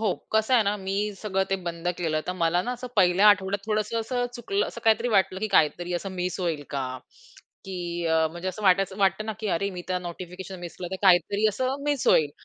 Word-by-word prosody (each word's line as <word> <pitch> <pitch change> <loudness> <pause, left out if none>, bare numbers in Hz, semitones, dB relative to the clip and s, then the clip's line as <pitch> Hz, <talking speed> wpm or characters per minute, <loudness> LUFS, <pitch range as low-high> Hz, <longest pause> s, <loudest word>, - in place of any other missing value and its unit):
हो. 220 -3 +1 0.2
कसं 220 +4 +3
आहे 230 - +6
ना, 205 +1 +1
मी 195 - 0 0.3
सगळं 195 -2 0
ते 195 - +2
बंद 170 0 -3
केलं. 155 -2 0
तर 180 - -1
मला 175 +2 +2
ना, 250 - -1
असं 250 - -6
1ल्या 190 +2 +5
आठवड्यात 200 0 +2
थोडंसं 215 +1 0
असं 245 +2 -1
चुकलं 395 - -1
असं - - -8
काहीतरी 225 +2 +3
वाटलं, 195 -4 +2
की 215 - 0
काहीतरी 175 +3 +2
असं 195 - -6
मिस 180 0 -2
होईल 165 -5 -1
का? 135 -2 -2 0.8
की 190 - -6 0.3
अ, 160 0 +3
म्हणजे 175 +3 -5
असं 200 +3 -6
वाटायचं 190 0 +3
वाटतं 195 +2 +1
ना, 220 - -2
की 215 - -2
अरे 200 +3 -1
मी 180 -1 -7
तर 185 -1 0
नोटिफिकेशन 180 +2 -8
मिस 175 -1 -8
केलं, 180 - -5
तर - - -1
काहीतरी 195 +3 +4
असं 255 +6 -1
मिस 285 -4 0
होईल. 150 -2 +4
190 Hz, 220 wpm, -26 LUFS, 175-215 Hz, 0.8 s, आहे